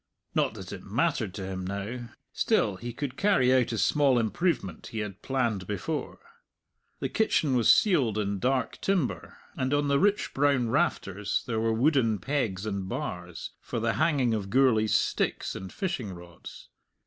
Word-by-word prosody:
Not - - +1
that - - -8
it - - -8
mattered - - 0
to 95 -2 -5
him 95 -1 -4
now; 100 +6 -5 0.2
still 100 -3 +1
he 120 +5 -6
could 130 +2 -5
carry 190 -12 +3
out 130 -2 +3
a 115 - -2
small 140 +3 +3
improvement 110 - -1
he 115 - -7
had 105 -3 -4
planned 115 -8 -1
before. 105 - -3 0.8
The - - 0
kitchen 155 -10 +1
was 120 -3 +6
ceiled 135 - +3
in 100 -2 -1
dark 125 +1 0
timber, 190 -9 -1 0.2
and 130 +2 0
on 145 0 +1
the 140 0 +3
rich 205 +4 +1
brown 135 -4 +2
rafters 105 - 0
there 115 -2 -1
were 115 0 +1
wooden 120 -2 +2
pegs 110 -4 -2
and 100 -3 -3
bars, 90 -2 -5
for - - -4
the 115 +1 +1
hanging 135 -8 +2
of 100 -3 -2
Gourlay's 115 -3 +3
sticks - - 0
and 95 0 -7
fishing 130 - -3
rods. 85 0 -12
115 Hz, 165 wpm, -28 LUFS, 100-140 Hz, 0.8 s, was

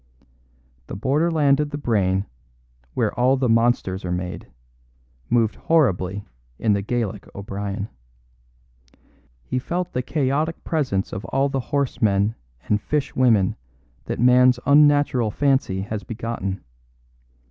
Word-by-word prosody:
The - - -6
borderland 145 - +2
of 150 -1 0
the 145 - -4
brain, 100 -8 +1 0.7
where - - 0
all 130 +2 +3
the 130 -1 +1
monsters 115 -5 +1
are 90 - -3
made, 90 0 -4 0.8
moved 115 -3 +2
horribly 100 - +1 0.3
in 110 - +2
the 100 - 0
Gaelic 105 -2 -3
O'Brien. 100 0 -4 1.6
He 130 - -2
felt 175 +7 -3
the 125 - 0
chaotic 150 +4 -1
presence 130 - -1
of 95 - -5
all 135 +1 +1
the 135 -1 -1
horse 140 -2 -1
men 100 0 +2 0.3
and 105 0 +1
fish 150 +2 -2
women 115 -7 +3 0.5
that - - -4
man's 125 +1 +5
unnatural 145 -5 +4
fancy 135 -6 +1
has 105 +1 -5
begotten. 110 -4 -4
120 Hz, 125 wpm, -22 LUFS, 100-140 Hz, 1.6 s, man's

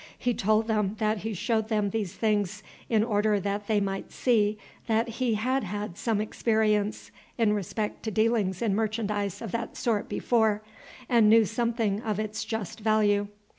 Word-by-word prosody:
He 245 - 0
told 215 +1 +2
them 210 -2 0
that 215 0 0
he 220 +1 -4
showed 220 +2 0
them 210 -3 +1
these 205 -3 -3
things 210 -4 0 0.3
in 220 -2 +3
order 210 -2 +2
that 200 +1 -3
they 215 -2 +2
might 195 -1 -3
see 215 -4 +2 0.3
that 225 0 +2
he 230 0 -1
had 255 +5 0
had 205 -1 -4
some 225 0 0
experience 215 -1 0 0.3
in 225 -3 +3
respect 210 +1 -3
to - - 0
dealings 215 -2 +1
in 215 -4 +1
merchandise 210 -2 -1
of 220 - -5
that 230 0 -4
sort 220 -4 0
before, 220 -3 +1 0.4
and 230 -3 +5
knew 225 0 +6
something 225 -2 -1
of 215 -3 -2
its 215 +1 -3
just 220 -4 -4
value. 210 -2 +2
215 Hz, 170 wpm, -27 LUFS, 205-225 Hz, 0.4 s, knew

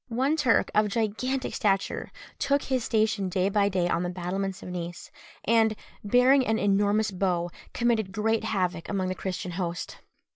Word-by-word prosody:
One 260 +6 +1
Turk, 260 -7 +2
of 215 0 +3
gigantic 230 +5 -1
stature, 195 -3 0 0.3
took 280 0 +1
his 260 -3 -1
station 215 -4 +1
day 185 +2 +1
by 200 0 +2
day 185 -2 0
on 170 - 0
the 175 - -2
battlements 185 +2 -3
of - - -7
Nice, 175 -1 -6 0.3
and, 220 -1 +3 0.3
bearing 250 +5 +5
an 220 - +2
enormous 205 +1 +2
bow, 180 -2 -1 0.2
committed 230 -5 0
great 220 +2 0
havoc 180 -5 -1
among 190 -2 -1
the - - -1
Christian 185 -1 -4
host. 175 -1 -4
200 Hz, 160 wpm, -27 LUFS, 185-225 Hz, 0.3 s, bearing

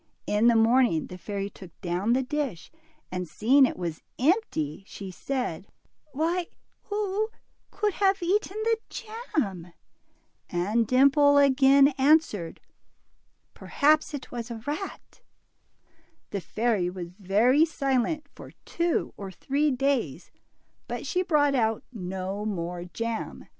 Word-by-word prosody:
In 210 +3 +2
the 235 - +5
morning 225 -6 +3
the 180 - -9
fairy 200 +1 -4
took 185 -4 -14
down 185 +6 0
the 260 +1 +2
dish, 260 - -4 0.4
and 180 -2 -4
seeing 260 - +4
it - - -6
was 170 -3 -4 0.2
empty, 245 - 0
she 195 -2 -8
said, 230 -4 -4 0.4
Why, 335 +5 -1 0.4
who 420 +1 -1 0.4
could 420 -2 -1
have 390 -1 +1
eaten 395 +3 0
the 455 0 +2
jam? 295 - -4 0.4
" - - -44
and 205 +6 0
Dimple 280 +3 +5
again 275 0 +6
answered, 265 - +2 0.9
Perhaps 305 +1 +2
it 275 - -8
was 235 -1 -5
a 225 -2 -7
rat." 345 +10 -6 1.1
The 200 - -3
fairy 215 -3 0
was 180 -2 -7
very 210 - +3
silent 280 -1 0
for - - -12
two 340 0 -1
or 195 -1 -6
three 280 +10 0
days, 255 - -1 0.6
but - - -5
she 365 -3 0
brought 295 -5 +2
out 225 -4 +1
no 190 0 -4
more 175 -4 -4
jam. 230 +5 -5
245 Hz, 125 wpm, -27 LUFS, 195-300 Hz, 1.1 s, again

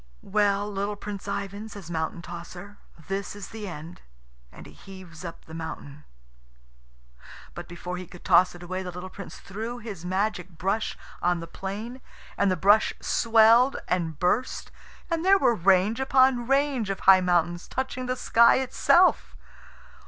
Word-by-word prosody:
"Well, 205 0 +1
little 205 0 -3
Prince 205 -1 -7
Ivan," 200 +2 -4
says 195 -5 -10
Mountain 160 +1 -3
tosser, 175 +4 -9 0.3
"this 195 +1 -4
is 205 -1 -8
the 220 -2 -7
end;" 165 -1 -9 0.5
and - - -13
he - - -13
heaves 185 -4 -12
up 170 -2 -9
the 160 - -13
mountain. 150 -3 -8 1.5
But 175 0 -8
before 180 +1 -6
he 180 0 -8
could 180 - -14
toss 180 -1 +4
it 175 - -11
away 185 +2 -4
the 185 - -6
little 180 +1 -8
Prince 200 - -9
threw 220 +5 -6
his 215 -7 -8
magic 185 0 -1
brush 195 +6 -1 0.2
on 175 0 +1
the 165 - -6
plain, 215 +9 -7 0.3
and 200 - +2
the 185 - 0
brush 205 +5 +4
swelled 230 +3 +4
and 165 -4 -1
burst, 180 - -1 0.4
and 330 0 0
there 390 +1 +6
were 240 - +3
range 195 +3 +3
upon 260 -2 +3
range 270 -5 +1
of 195 - -3
high 190 -1 +7
mountains, 175 -1 0
touching 255 -1 -4
the 255 - -1
sky 235 -1 +5
itself. 305 +7 +3
195 Hz, 160 wpm, -26 LUFS, 180-225 Hz, 1.5 s, high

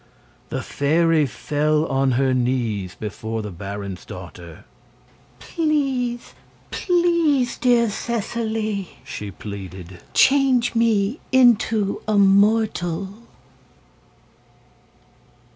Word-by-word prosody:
The - - -3
fairy 160 +1 +2
fell 150 +5 0
on 135 -3 +1
her 130 +1 +2
knees 120 -7 -1
before 110 +1 -5
the 105 - -6
baron's 100 +1 -7
daughter. 90 -2 -11 0.7
"Please 270 -7 -1 0.4
please, 340 -8 +1
dear 240 -2 +3
Seseley," 220 -2 -3
she 105 -6 -7
pleaded, 95 -3 -9
"change 265 -3 +4
me 230 +1 +1
into 225 -5 +3
a 215 -1 +2
mortal!" 200 -3 +2
195 Hz, 80 wpm, -22 LUFS, -, 0.7 s, change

